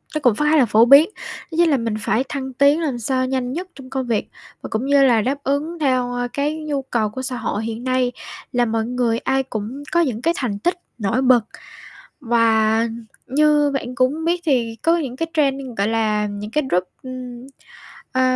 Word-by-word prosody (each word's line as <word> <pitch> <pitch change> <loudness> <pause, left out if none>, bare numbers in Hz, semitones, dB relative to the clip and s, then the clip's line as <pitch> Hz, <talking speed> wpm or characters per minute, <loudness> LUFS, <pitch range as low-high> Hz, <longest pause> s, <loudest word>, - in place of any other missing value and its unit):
nó - - +1
cũng 245 -6 +3
khá 300 +5 +2
là 260 - +5
phổ 220 +2 +5
biến, 280 +6 +7
đó 325 - -9
chính 345 -1 +4
là 285 - +3
mình 230 -2 -2
phải 235 +5 +1
thăng 265 -2 -4
tiến 280 +4 +4
làm 275 -7 -2
sao 255 +3 0
nhanh 255 -1 -2
nhất 360 +5 -4
trong 270 -1 -12
công 265 -2 -3
việc 225 -3 -1 0.3
và - - -6
cũng 220 +4 -2
như 280 0 +4
là 235 -5 +4
đáp 270 +5 -1
ứng 305 +5 -2
theo, 255 -4 +1
a, 245 0 -2
cái 285 +5 -2
nhu 290 -2 -2
cầu 235 -5 -1
của 260 +5 -6
xã 255 -1 -4
hội 220 -2 -3
hiện 230 +1 -5
nay 255 -1 +1 0.4
là 245 -1 +2
mọi 225 -1 -1
người 240 -2 0
ai 270 +2 0
cũng 250 +3 -6
có 340 - +3
những 245 -8 -1
cái 335 +5 +2
thành 210 -6 -2
tích 350 - 0 0.2
nổi 230 +3 0
bật. 250 -4 +4 0.8
Và 225 -2 +3 0.4
như 295 +1 +3
bạn 255 -2 -3
cũng 280 +5 +1
biết 345 +1 +1
thì 240 -6 +1
có 335 +1 +3
những 270 -7 -4
cái 330 +5 -2
trend, 275 -3 +1 0.2
gọi 200 +1 +1
là, 215 -2 0
những 205 +1 -6
cái 300 +5 +1
group, 180 +1 +2 0.2
ừm, 255 -1 -8 0.6
ờ, 260 - +1
255 Hz, 215 wpm, -20 LUFS, 230-280 Hz, 0.8 s, biến